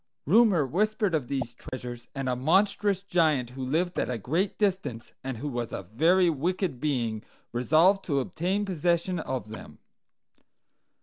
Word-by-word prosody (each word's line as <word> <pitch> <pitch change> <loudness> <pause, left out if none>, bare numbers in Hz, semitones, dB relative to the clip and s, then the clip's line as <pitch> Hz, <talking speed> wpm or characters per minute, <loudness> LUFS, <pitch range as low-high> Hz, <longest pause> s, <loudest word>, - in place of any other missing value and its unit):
"Rumor 195 - +5
whispered 210 - 0
of 145 -6 0
these 130 -3 -3
treasures; 120 -1 -8
and 135 -1 -3
a 125 - +1
monstrous 195 +7 +2
giant 155 -10 +1
who 130 +1 -6
lived 165 +7 0
at - - -1
a 125 - -1
great 165 - -1
distance, 180 - -1
and 130 -2 -4
who 145 - -5
was 120 -4 -3
a - - -5
very 175 +8 +4
wicked 170 -1 -1
being, 120 -7 -1 0.3
resolved 160 +11 +4
to 140 -5 +1
obtain 180 +9 -1
possession 175 0 0
of 130 -7 -4
them. 110 - -10
155 Hz, 150 wpm, -27 LUFS, 125-185 Hz, 0.3 s, Rumor